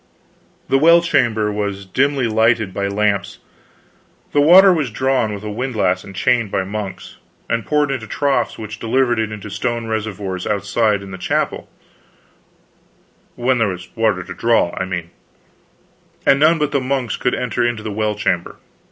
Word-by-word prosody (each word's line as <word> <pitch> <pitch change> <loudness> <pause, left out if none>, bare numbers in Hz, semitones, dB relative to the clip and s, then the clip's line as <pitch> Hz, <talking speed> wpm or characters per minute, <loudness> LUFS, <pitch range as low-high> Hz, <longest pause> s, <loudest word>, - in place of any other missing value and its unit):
The 135 - +3
well 170 +3 +6
chamber 110 -10 +1
was 100 -1 -3
dimly 135 +6 +1
lighted 110 -2 +2
by 100 0 -1
lamps; 100 0 -1 0.9
the 145 - +3
water 185 +5 +8
was 155 -7 -1
drawn 130 -1 0
with 100 0 -6
a 105 - -5
windlass 105 -6 -1
and 95 - -11
chain 120 +3 +2
by 95 -1 -1
monks, 100 0 -6 0.3
and 115 -1 -1
poured 150 -2 +1
into 120 -5 -4
troughs 140 +5 0
which 110 -1 -8
delivered 120 0 +1
it 110 -1 -1
into 105 -1 -8
stone 115 +3 -2
reservoirs 105 -4 -4
outside 105 0 0
in 95 - -10
the 95 - -8
chapel - - -2 1.7
when 125 +1 +1
there 115 - +2
was 90 -2 -7
water 110 -5 +1
to 95 - -8
draw, 115 -2 +1
I 95 - -2
mean 85 -2 -5 1.1
and 135 - +5
none 160 +3 +5
but 150 -2 -1
monks 130 -2 -1
could 125 - -1
enter 120 0 0
the 110 -1 -6
well 105 0 -1
chamber. 105 - -1
110 Hz, 160 wpm, -19 LUFS, 100-130 Hz, 1.7 s, water